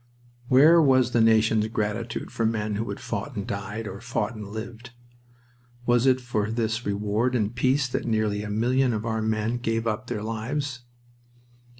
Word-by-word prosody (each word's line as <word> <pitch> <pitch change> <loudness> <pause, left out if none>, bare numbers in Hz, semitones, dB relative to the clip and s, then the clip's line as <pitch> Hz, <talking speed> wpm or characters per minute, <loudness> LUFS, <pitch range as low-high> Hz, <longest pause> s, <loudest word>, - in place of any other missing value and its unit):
Where 155 +7 +7
was 130 -4 +4
the 120 - +3
nation's 110 -1 +4
gratitude 110 +1 -3
for 115 - -2
the 110 - +3
men 105 -1 -2
who 110 +2 -3
had 100 - -5
fought 140 - -5
and 100 -2 -3
died, 105 +2 -5
or 100 +1 -7
fought 115 -1 -2
and 105 -3 -8
lived? 115 +3 -7 1.0
Was 120 +1 +3
it 130 0 +4
for 110 -4 -2
this 115 0 -2
reward 105 +5 0
in 105 -3 0
peace 130 +3 +1
that 125 - -3
nearly 110 -2 0
a 105 - -5
million 125 +4 +1
of 110 0 -3
our 110 -1 -1
men 110 +2 0
gave 115 -1 -1
up 115 +3 -2
their 105 - -3
lives? 120 +3 -3
115 Hz, 180 wpm, -25 LUFS, 105-125 Hz, 1.0 s, Where